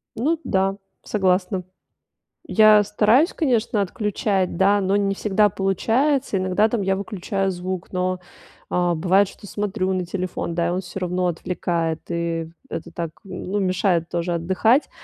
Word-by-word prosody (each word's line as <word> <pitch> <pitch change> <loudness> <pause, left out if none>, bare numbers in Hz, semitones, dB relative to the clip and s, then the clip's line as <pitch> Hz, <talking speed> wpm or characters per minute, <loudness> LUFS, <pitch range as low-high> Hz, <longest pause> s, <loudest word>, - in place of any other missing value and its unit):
Ну 300 +8 0
да, 195 0 +1 0.3
согласна. 190 -1 0 0.9
Я 215 -1 +7
стараюсь, 220 - +3
конечно, 235 - +1
отключать, 195 -1 -1
да, 200 +3 +4
но 195 0 +1
не 200 -1 +1
всегда 210 +1 +2
получается. 225 - +1
Иногда 185 +4 +2
там 225 -2 -1
я 195 0 +1
выключаю 195 -1 -2
звук, 185 0 -5
но, 185 0 -1 0.5
а, 175 -1 +1
бывает, 190 +5 +3
что 200 - -13
смотрю 200 -2 -2
на 185 -1 -1
телефон, 180 -2 -4
да, 170 0 +1
и - - 0
он 180 - -1
всё 195 +1 -7
равно 180 0 0
отвлекает, 170 -1 -2
и 170 -1 -2 0.2
это - - -6
так, 170 -2 -4
ну, 190 +1 -4
мешает 185 -3 +1
тоже 175 0 -1
отдыхать. 190 - +2
190 Hz, 150 wpm, -22 LUFS, 180-210 Hz, 0.9 s, Я